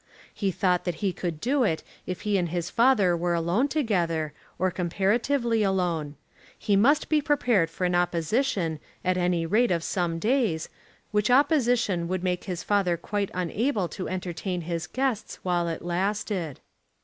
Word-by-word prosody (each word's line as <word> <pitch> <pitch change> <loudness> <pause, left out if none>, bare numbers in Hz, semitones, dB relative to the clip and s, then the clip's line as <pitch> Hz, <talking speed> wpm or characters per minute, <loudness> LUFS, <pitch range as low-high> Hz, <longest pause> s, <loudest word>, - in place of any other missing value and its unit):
He 200 - -1
thought 180 0 +1
that 175 -2 -1
he 190 - +1
could 170 -4 -4
do 260 - +1
it 160 -8 0 0.2
if 180 - -4
he 210 -1 0
and 175 -3 +1
his 175 0 -3
father 230 -7 +4
were 175 0 0
alone 175 +11 +1
together, 175 - 0 0.2
or 185 +1 +1
comparatively 225 +7 +1
alone. 175 -7 0 0.4
He 205 - +1
must 270 +10 +4
be 310 -1 +2
prepared 245 - +2
for 180 +2 -3
an 180 - +1
opposition, 175 - 0 0.3
at 185 0 +2
any 175 -2 +1
rate 220 +8 +3
of 170 -2 0
some 175 -2 -1
days, 215 - 0 0.4
which 210 +1 +1
opposition 245 - +3
would 185 0 -2
make 180 -1 -1
his 180 -3 -4
father 195 -4 +1
quite 200 +3 -2
unable 195 - 0
to 185 - -5
entertain 180 0 -3
his 170 0 -3
guests 260 -2 -2
while 175 -2 +1
it 165 - -4
lasted. 185 - -2
185 Hz, 160 wpm, -26 LUFS, 170-220 Hz, 0.4 s, father